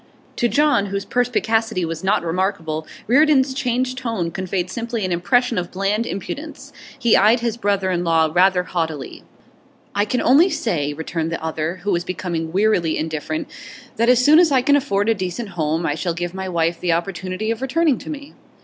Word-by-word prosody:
To 240 - +2
John, 290 -8 +2
whose 200 0 -3
perspicacity 225 -4 0
was 165 0 -5
not 190 -2 +1
remarkable, 165 -3 -2 0.2
Reardon's 270 +1 +4
changed 255 -1 -1
tone 225 -9 -2
conveyed 185 0 -3
simply 230 0 -3
an 185 - -3
impression 245 +6 +1
of 175 - -5
bland 200 +4 -1
impudence. 280 - -7 0.2
He 235 -2 +3
eyed 220 +4 +4
his 235 -2 -1
brother 200 -4 0
in 175 -1 -1
law 160 -2 +2
rather 180 +1 +4
haughtily. 160 -6 -4 0.7
'I 205 +1 +1
can 250 +4 -1
only 300 +9 +5
say,' 150 - -1
returned 160 +1 -3
the 165 - -4
other, 160 +3 -3
who 205 - 0
was 175 -1 0
become 170 -3 -4
wearily 185 -4 +2
indifferent, 155 0 -3 0.5
'that 230 +2 +2
as 250 0 +4
soon 310 +2 +7
as 345 -4 +4
I 260 -2 +3
can 285 +2 +4
afford 205 -8 0
a 225 - +4
decent 200 +3 -4
home 165 -2 -1
I 145 - +1
shall 165 +2 -3
give 175 +1 -4
my 190 0 -5
wife 170 -1 0
the 175 -2 +1
opportunity 185 +4 -3
of 230 - -4
returning 290 +1 +1
to - - -10
me. 290 -1 -7
195 Hz, 185 wpm, -20 LUFS, 170-240 Hz, 0.7 s, soon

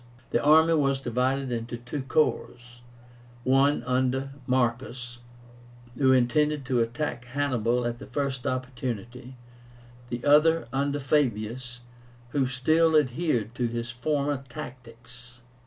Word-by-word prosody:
The 120 - +1
army 160 +2 +6
was 140 -3 +2
divided 130 +2 -1
into 120 0 -4
two 125 +4 -5
corps; 120 -4 -1 0.6
one 135 +3 +3
under 130 +1 0 0.2
Marcus, 120 -1 -1 0.8
who 130 0 +3
intended 140 +3 +2
to 125 -2 +1
attack 120 +2 -2
Hannibal 125 -3 0
at 120 0 -3
the - - -10
first 130 -1 -3
opportunity; 125 -1 -5 0.7
the 120 +1 -5
other 150 0 +4
under 140 +1 0
Fabius, 125 -3 -1 0.5
who 135 +1 +1
still 155 +6 +2
adhered 125 -5 0
to 120 0 -1
his 120 0 -4
former 140 +2 -1
tactics. 125 0 -11
130 Hz, 115 wpm, -27 LUFS, 120-140 Hz, 0.8 s, army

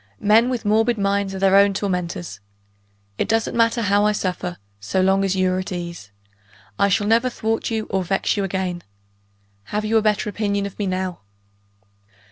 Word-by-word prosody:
Men 220 +4 +4
with 245 -3 -3
morbid 225 +3 +2
minds 200 -1 0
are - - -4
their 195 0 +3
own 200 0 +5
tormentors. 180 - -3 0.8
It - - 0
doesn't 225 -1 0
matter 230 0 +2
how 205 0 +3
I 210 0 +3
suffer, 180 -3 -3 0.2
so 100 - -2
long 190 +1 +3
as 195 -1 0
you 185 -1 +2
are 185 - -1
at 185 - -5
ease. 170 - -6 0.7
I 200 0 +4
shall 205 +2 +1
never 230 +4 +3
thwart 225 -2 -2
you 220 -2 -2
or 190 -1 0
vex 190 +2 0
you 200 - -1
again. 185 -2 -2 0.8
Have 210 +1 -3
you 225 +1 +2
a - - +4
better 215 -1 +1
opinion 205 -1 -1
of 200 - -8
me 205 - -1
now?" 185 -1 -3
200 Hz, 185 wpm, -21 LUFS, 185-215 Hz, 0.8 s, own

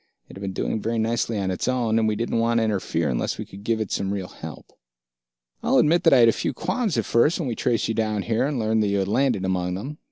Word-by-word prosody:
It - - -12
had 95 - -10
been 100 -1 -3
doing 110 - -2
very 115 +2 -1
nicely 115 0 0
on 95 -2 -1
its 90 - -3
own, 120 -3 +1
and 110 - +2
we 110 - +1
didn't 115 +1 -1
want 115 +1 +2
to 115 - +3
interfere 95 -7 -1
unless 60 -3 -1
we - - -5
could 100 +1 -12
give 115 +1 0
it 110 - -3
some 95 0 -1
real 95 -2 -4
help. 80 -5 -10 0.9
"I'll - - +2
admit 165 +3 +3
that - - +6
I - - +7
had 120 -2 +7
a - - +6
few - - -3
qualms 230 - -1
at - - 0
first, 145 +8 +3
when 165 - -3
we 120 - -1
traced 115 0 0
you 115 - -1
here 110 +2 0
and 145 -2 -2
learned 110 -1 +1
that 105 - +1
you 100 0 +1
had 95 -1 0
landed 115 -3 +1
among 90 -1 -1
them. 135 +10 -6
110 Hz, 275 wpm, -24 LUFS, 100-120 Hz, 0.9 s, I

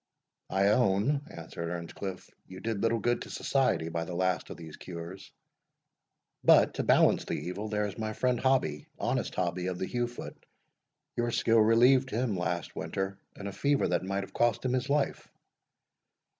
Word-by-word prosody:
"I 95 +1 +3
own," 120 +6 +2
answered 85 0 -6
Earnscliff; 90 +2 -5 0.2
"you 95 0 -9
did 110 -1 -2
little 115 0 +2
good 120 +3 0
to - - -7
society 130 -12 +1
by 85 0 -2
the 85 +1 -6
last 95 0 0
of - - -7
these 80 -2 -9
cures. 90 +2 -8 1.1
But, - - +6
to - - -2
balance - - +4
the - - -2
evil, 100 +5 -4
there 105 0 0
is 105 +2 -6
my 110 -1 -2
friend 125 +1 +1
Hobbie, 130 - +1
honest - - -1
Hobbie 90 0 -1
of 90 -1 -2
the 95 - -2
Heugh 120 +3 -1
foot, 120 - -9 0.7
your 120 0 0
skill 115 0 +3
relieved 125 +4 +5
him 115 -2 0
last 85 -1 -2
winter 95 0 -3 0.2
in 100 - -8
a 100 - -3
fever 140 +8 +1
that 90 - +1
might 100 +1 -2
have - - -11
cost 120 +1 +1
him 125 - +1
his 130 +2 -1
life." 140 -1 0
100 Hz, 175 wpm, -30 LUFS, 90-120 Hz, 1.1 s, But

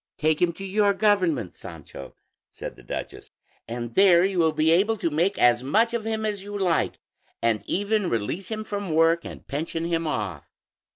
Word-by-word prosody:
"Take 155 -1 +1
him 175 -1 +3
to 195 +4 -8
your 200 +1 +2
government, 185 - +1
Sancho," 70 - -10 0.4
said - - -8
the - - -15
duchess, - - -7 0.4
"and 120 0 -5
there 185 -2 +6
you 190 -2 -1
will 160 -1 +4
be 155 +1 +2
able 205 +6 +3
to 170 -4 -1
make 175 +7 +1
as 120 0 +4
much 220 - +2
of 230 -2 -2
him 220 -1 -2
as 205 -2 -2
you 205 +1 -6
like, 180 -4 0 0.4
and 115 -2 +1
even 205 -1 0
release 115 - -2
him 215 0 -4
from 200 -6 -3
work 165 +1 +4
and - - -9
pension 165 +3 -3
him 165 -1 -1
off." 100 - -3
170 Hz, 185 wpm, -25 LUFS, 155-205 Hz, 0.4 s, there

